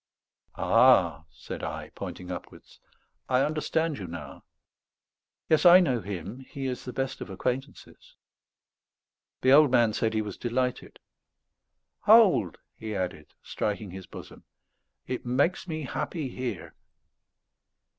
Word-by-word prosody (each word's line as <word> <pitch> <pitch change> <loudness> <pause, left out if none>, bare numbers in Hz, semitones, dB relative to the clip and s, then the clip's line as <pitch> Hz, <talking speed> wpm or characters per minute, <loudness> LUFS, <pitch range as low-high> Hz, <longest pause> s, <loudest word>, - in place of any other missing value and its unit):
"Ah," 85 - +4
said - - -9
I, - - -5
pointing 90 0 -7
upwards, 90 - -10 0.5
"I 130 0 +3
understand 155 0 -1
you 95 - -6
now. 85 - -9 1.0
Yes, 155 - +3
I 180 0 +9
know 130 -10 +1
Him; 100 +4 -6
He 135 +1 -7
is 130 -1 -4
the 125 - -5
best 135 +1 -3
of - - -6
acquaintances." 125 +8 -5 1.3
The 130 - +4
old 145 +1 +7
man 120 -3 +3
said 110 0 -1
he 110 - +1
was 105 -3 -7
delighted. 125 +1 -2 1.0
"Hold," 200 - +5 0.2
he 110 -1 -6
added, 90 -5 -5
striking 105 -2 -3
his 95 0 -9
bosom; - - -11 0.6
"it 125 - -4
makes 140 +10 0
me 155 -2 -4
happy 145 +2 -4
here." 120 -10 -5
125 Hz, 125 wpm, -27 LUFS, 100-140 Hz, 1.3 s, I